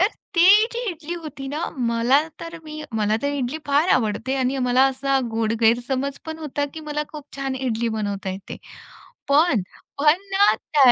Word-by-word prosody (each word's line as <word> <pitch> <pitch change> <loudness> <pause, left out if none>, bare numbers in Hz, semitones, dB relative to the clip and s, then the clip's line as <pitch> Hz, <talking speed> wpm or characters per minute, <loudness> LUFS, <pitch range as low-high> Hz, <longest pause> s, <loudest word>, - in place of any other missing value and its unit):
तर 370 - +6 0.3
ती 340 +2 +6 0.3
जी 470 - -4
इडली 335 0 -6
होती 280 -3 -7
ना. 305 +4 -3 0.2
मला 235 +5 +3 0.2
तर 335 0 -7
मी 310 0 -7
मला 215 -1 +1
तर 285 - +1
इडली 275 +2 -2
फार 290 +5 +2
आवडते 230 +2 -1
आणि 260 +1 0
मला 250 +2 +4
असा 270 +1 0
गोड 225 0 0
गैरसमज 255 +4 +1
पण 320 0 -5
होता, 295 -2 -2
की 320 - -6
मला 300 -1 -3
खूप 300 -3 -9
छान 270 -1 -2
इडली 235 -3 -1
बनवता 200 -2 -3
येते. 190 +1 -7 0.7
पण 285 - +4 0.4
पण 305 +5 +4
ना, 400 +1 +5
त्या 270 -5 +4
275 Hz, 175 wpm, -23 LUFS, 240-305 Hz, 0.7 s, तर